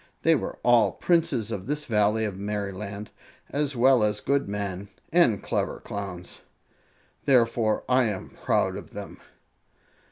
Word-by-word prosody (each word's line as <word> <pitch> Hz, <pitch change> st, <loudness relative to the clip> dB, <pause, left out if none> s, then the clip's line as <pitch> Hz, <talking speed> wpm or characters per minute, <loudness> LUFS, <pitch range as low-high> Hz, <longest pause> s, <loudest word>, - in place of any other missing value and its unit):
They 165 Hz, -, +5 dB
were 150 Hz, -, -2 dB
all 115 Hz, -6 st, +4 dB
Princes 165 Hz, -, +1 dB
of 100 Hz, -2 st, -5 dB
this 150 Hz, +1 st, -2 dB
Valley 105 Hz, 0 st, +2 dB
of 100 Hz, -3 st, -4 dB
Merryland, 100 Hz, 0 st, -4 dB, 0.4 s
as 145 Hz, -1 st, -1 dB
well 125 Hz, -1 st, +5 dB
as 105 Hz, -1 st, +1 dB
good 140 Hz, -2 st, 0 dB
men 100 Hz, -1 st, -4 dB, 0.2 s
and 170 Hz, -, +4 dB
clever -, -, -2 dB
Clowns. 90 Hz, -7 st, -6 dB, 0.9 s
Therefore 115 Hz, -4 st, +3 dB
I 125 Hz, 0 st, +4 dB
am 105 Hz, -4 st, -3 dB
proud -, -, 0 dB
of -, -, -10 dB
them." -, -, -8 dB
110 Hz, 135 wpm, -26 LUFS, 100-130 Hz, 0.9 s, They